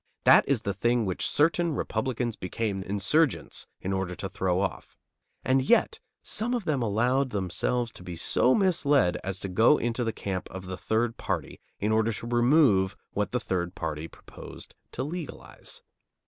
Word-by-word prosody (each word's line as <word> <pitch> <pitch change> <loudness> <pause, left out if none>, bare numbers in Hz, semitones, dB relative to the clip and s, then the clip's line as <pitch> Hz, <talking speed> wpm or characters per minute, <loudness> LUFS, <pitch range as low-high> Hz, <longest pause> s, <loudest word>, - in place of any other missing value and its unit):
That - - +6
is 125 -6 +1
the 100 - -1
thing 120 +3 +1
which 95 -1 -1
certain 165 +1 +2
Republicans 125 -5 -2
became 100 +1 -3
"insurgents" 105 +11 +1
in 95 +1 -3
order 95 -1 -2
to 95 - -5
throw 95 -2 0
off. 100 -1 -4 0.5
And 130 +1 +3
yet 235 - +3 0.2
some 240 +3 -1
of 235 -6 -3
them 145 -5 0
allowed 120 +5 +1
themselves 105 +4 -1
to - - -12
be 90 -1 -6
so 125 +9 +2
misled 145 - +2
as 95 0 -2
to - - -3
go 110 +10 +4
into 120 +1 -1
the 115 - 0
camp 95 -4 -4
of 95 0 -8
the 95 0 -5
third 115 +4 -1
party 85 -9 -3 0.2
in 105 +2 0
order 110 +1 +2
to 110 - -7
remove 120 -5 +3 0.2
what 105 0 -2
the 125 - 0
third 90 -4 -2
party 80 -1 -4
proposed - - -12 0.2
to 130 - -3
legalize. 160 +2 -7
110 Hz, 170 wpm, -27 LUFS, 95-130 Hz, 0.5 s, That